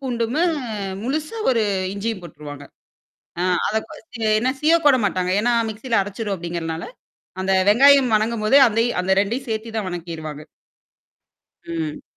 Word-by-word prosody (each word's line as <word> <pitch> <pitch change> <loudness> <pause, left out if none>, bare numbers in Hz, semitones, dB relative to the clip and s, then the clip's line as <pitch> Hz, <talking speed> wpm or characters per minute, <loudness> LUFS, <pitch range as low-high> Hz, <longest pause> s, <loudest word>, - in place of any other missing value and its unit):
பூண்டு 245 -4 -2
மு 325 - +2 0.6
முழுசு 305 - -3
ஒரு 235 -3 +2 0.3
இஞ்சியும் 205 0 -3
போட்டுருவாங்க. 145 -3 -10 0.8
ஆ - - +1 0.2
அத 215 - 0 0.4
ச - - -5 0.2
என்னா 255 +3 +1
சீவ 315 +2 +5
கூட 285 -3 +6
மாட்டாங்க. 185 -2 -1
ஏன்னா 240 +2 +1 0.2
மிக்ஸியில 225 +2 -1
அரைச்சுரும் 205 +1 -4
அப்டிங்கிறதுனால, 170 -2 -5 0.6
அந்த 190 - 0 0.2
வெங்காயம் 270 +1 +6
வணங்கும்போது 215 +3 +2
அந்தயும் 230 -1 0
அந்த 190 +1 +1
2யும் 235 +6 -2
சேர்த்து 220 +1 -4
தான் 215 -3 -2
வணக்கிருவாங்க. 160 -4 -6 1.2
ம். 320 -4 -4
220 Hz, 135 wpm, -21 LUFS, 185-255 Hz, 1.2 s, கூட